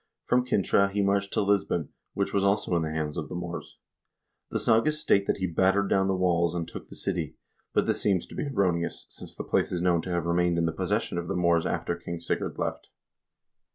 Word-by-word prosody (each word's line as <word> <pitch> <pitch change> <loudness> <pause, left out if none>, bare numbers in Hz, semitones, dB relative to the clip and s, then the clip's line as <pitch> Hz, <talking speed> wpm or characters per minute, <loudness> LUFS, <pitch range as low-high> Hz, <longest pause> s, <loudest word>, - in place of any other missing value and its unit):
From 125 0 +3
Cintra 100 -3 +3
he 100 0 0
marched 100 0 +1
to 105 - +2
Lisbon, 100 -5 +1 0.3
which 100 - -1
was 100 - +2
also 100 -2 +2
in 85 - +2
the 80 - -2
hands 75 -1 -3
of 75 - -4
the - - -5
Moors. 85 0 -6 0.7
The - - -1
sagas 150 +8 +3
state 100 -8 +2
that - - +1
he 95 - -1
battered 95 +3 +2
down 95 0 +3
the 95 - +1
walls 85 -2 +2
and 85 -1 -2
took - - -9
the - - -10
city, - - -3 0.4
but - - +2
this - - 0
seems 95 -4 +1
to - - -14
be 150 - -2
erroneous, 90 -10 0
since - - -10
the - - -5
place - - +1
is 90 - -1
known 85 -2 +3
to 95 - -7
have 85 -2 -1
remained 85 0 +2
in 85 - +2
the 80 - +1
possession 85 - -1
of 85 - -5
the 95 - -2
Moors 85 -2 +2
after 85 - -1
King 85 0 -6
Sigurd 85 - -2
left. - - -3
90 Hz, 225 wpm, -27 LUFS, 85-100 Hz, 0.7 s, From